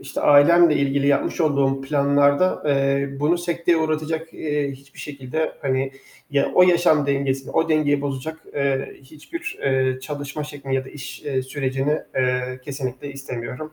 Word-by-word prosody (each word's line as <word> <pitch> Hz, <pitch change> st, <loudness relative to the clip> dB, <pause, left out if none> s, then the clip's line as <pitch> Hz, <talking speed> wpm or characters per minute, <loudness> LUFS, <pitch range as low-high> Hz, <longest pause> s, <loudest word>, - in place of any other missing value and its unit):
işte, 135 Hz, -, -5 dB
ailemle 155 Hz, +3 st, +6 dB
ilgili 140 Hz, 0 st, +1 dB
yapmış 140 Hz, +4 st, +1 dB
olduğum 140 Hz, -3 st, +2 dB
planlarda, 140 Hz, +4 st, +2 dB
eee, 140 Hz, -1 st, +2 dB
bunu 160 Hz, +4 st, +2 dB
sekteye 170 Hz, 0 st, +1 dB
uğratacak, 160 Hz, +1 st, -2 dB
eee, 145 Hz, -2 st, -2 dB
hiçbir 140 Hz, +1 st, -16 dB
şekilde, 145 Hz, +2 st, -3 dB
hani, 135 Hz, 0 st, 0 dB, 0.4 s
ya 140 Hz, -1 st, +1 dB
o 180 Hz, -, +7 dB
yaşam 175 Hz, -5 st, +4 dB
dengesini, 135 Hz, -1 st, -1 dB
o 160 Hz, 0 st, +1 dB
dengeyi 150 Hz, -2 st, +2 dB
bozacak, 140 Hz, +3 st, -4 dB, 0.2 s
eee, 140 Hz, -1 st, -1 dB
hiçbir, 155 Hz, -, -8 dB
eee, 130 Hz, -1 st, +1 dB
çalışma 145 Hz, +2 st, -5 dB
şeklini 140 Hz, -2 st, -5 dB
ya 130 Hz, 0 st, 0 dB
da -, -, -11 dB
iş, 135 Hz, -2 st, -9 dB
eee, 135 Hz, -3 st, -1 dB
sürecini, 135 Hz, +2 st, -1 dB, 0.2 s
eee, 125 Hz, 0 st, 0 dB
kesinlikle 135 Hz, 0 st, -5 dB
istemiyorum. 135 Hz, +2 st, -7 dB
140 Hz, 150 wpm, -22 LUFS, 135-155 Hz, 0.4 s, o